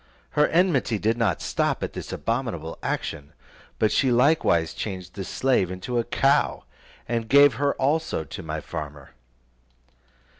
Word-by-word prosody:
Her 150 0 +3
enmity 170 - +2
did 110 +3 +1
not 115 -7 0
stop - - -1
at - - -4
this - - -7
abominable - - -3
action, 70 0 -4 0.4
but 110 - +2
she 135 - +2
likewise 120 - +3
changed 95 -3 -6
the 100 - -5
slave 125 -3 +1
into 95 +7 -3
a - - +1
cow, 140 +4 +1 0.4
and 115 -1 -2
gave 140 -1 +7
her 145 -1 +2
also 145 - 0
to 70 - -8
my - - -5
farmer. 75 -2 -7
115 Hz, 145 wpm, -25 LUFS, 90-140 Hz, 0.4 s, gave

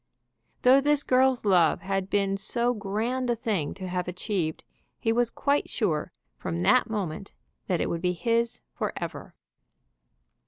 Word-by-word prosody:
Though 260 +2 +7
this 290 0 +2
girl's 255 -2 +3
love 180 -5 +4
had 195 0 -2
been 195 -1 +1
so 235 +5 0
grand 230 +5 -2
a 240 - +2
thing 210 - -2
to 185 - -6
have 180 0 -2
achieved, 180 -3 -2 0.3
he 225 - 0
was 240 0 +2
quite 285 +3 0
sure 165 -10 -1 0.3
from 85 - -3
that 90 - +4
moment 195 -3 -4 0.3
that 180 -3 +1
it - - +1
would 165 - -2
be 180 0 +1
his 230 +4 0
forever. - - -5
205 Hz, 150 wpm, -27 LUFS, 180-240 Hz, 0.3 s, Though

